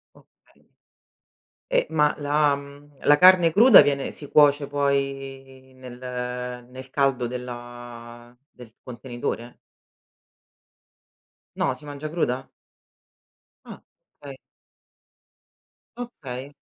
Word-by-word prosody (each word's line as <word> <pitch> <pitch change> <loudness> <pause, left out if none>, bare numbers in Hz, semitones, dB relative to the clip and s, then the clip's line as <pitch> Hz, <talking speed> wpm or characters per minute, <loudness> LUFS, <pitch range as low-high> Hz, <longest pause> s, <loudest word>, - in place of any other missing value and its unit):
Okay. - - -27 1.0
Eh - - +1
ma 150 -2 +2
la, 145 0 +2
mhmm, 140 0 -14
la 145 - +6
carne 180 -2 +6
cruda 225 +4 +8
viene 140 -1 -1
si 145 - -11
cuoce 145 -1 +4
poi 135 -2 -3
nel 125 -1 -11 0.7
nel 130 +1 -11
caldo 135 -3 0
della 120 -1 -9
del 120 -3 -15
contenitore? 120 -1 -6 2.0
No, - - 0
si - - -18
mangia 145 +1 -6
cruda? 135 -6 -2 1.2
Ah, - - -11 0.4
okay. 140 -2 -10 1.6
Okay. 140 - -8
135 Hz, 90 wpm, -24 LUFS, 125-145 Hz, 2.0 s, cruda